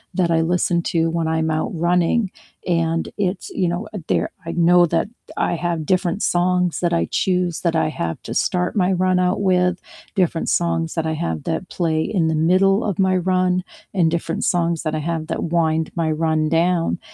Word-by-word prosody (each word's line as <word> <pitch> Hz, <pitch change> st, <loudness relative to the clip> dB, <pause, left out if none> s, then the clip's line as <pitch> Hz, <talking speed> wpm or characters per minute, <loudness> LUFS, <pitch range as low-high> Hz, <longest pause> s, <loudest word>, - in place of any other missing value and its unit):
that 175 Hz, -3 st, +1 dB
I 165 Hz, 0 st, +3 dB
listen 170 Hz, +1 st, +1 dB
to 165 Hz, -1 st, 0 dB
when 165 Hz, -1 st, -1 dB
I'm 160 Hz, 0 st, 0 dB
out 155 Hz, 0 st, -1 dB
running. 180 Hz, +5 st, +1 dB, 0.4 s
And 165 Hz, -1 st, 0 dB
it's, 190 Hz, -2 st, -2 dB
you 180 Hz, -2 st, 0 dB
know, 175 Hz, +6 st, -3 dB, 0.2 s
there -, -, +1 dB
I 165 Hz, -, -3 dB
know 175 Hz, +1 st, +5 dB
that 165 Hz, +3 st, 0 dB, 0.3 s
I -, -, +1 dB
have 170 Hz, -2 st, -2 dB
different 185 Hz, +3 st, 0 dB
songs 180 Hz, 0 st, +1 dB
that 175 Hz, -1 st, 0 dB
I 170 Hz, -, +1 dB
choose 180 Hz, -3 st, 0 dB
that 170 Hz, -2 st, 0 dB
I 160 Hz, -, +2 dB
have 85 Hz, -, -4 dB
to -, -, -5 dB
start 180 Hz, 0 st, 0 dB
my 190 Hz, -2 st, +2 dB
run 185 Hz, 0 st, +2 dB
out 180 Hz, +2 st, +1 dB
with, 180 Hz, -2 st, +2 dB, 0.4 s
different 175 Hz, -4 st, 0 dB
songs 165 Hz, -1 st, 0 dB
that 165 Hz, -1 st, -1 dB
I 160 Hz, -, -1 dB
have 80 Hz, -, -3 dB
that 165 Hz, +3 st, -3 dB
play 160 Hz, -3 st, 0 dB
in 165 Hz, -1 st, 0 dB
the 160 Hz, -, +1 dB
middle 185 Hz, +6 st, +3 dB
of 200 Hz, -5 st, -2 dB
my 190 Hz, -1 st, +2 dB
run, 185 Hz, 0 st, +1 dB, 0.3 s
and 175 Hz, -4 st, +3 dB
different 170 Hz, +4 st, -2 dB
songs 170 Hz, -2 st, +1 dB
that 155 Hz, -2 st, -2 dB
I -, -, -1 dB
have 160 Hz, 0 st, -3 dB
that -, -, -3 dB
wind 160 Hz, -1 st, 0 dB
my 165 Hz, -2 st, 0 dB
run 155 Hz, 0 st, 0 dB
down. 165 Hz, +1 st, +1 dB
170 Hz, 195 wpm, -21 LUFS, 160-180 Hz, 0.4 s, know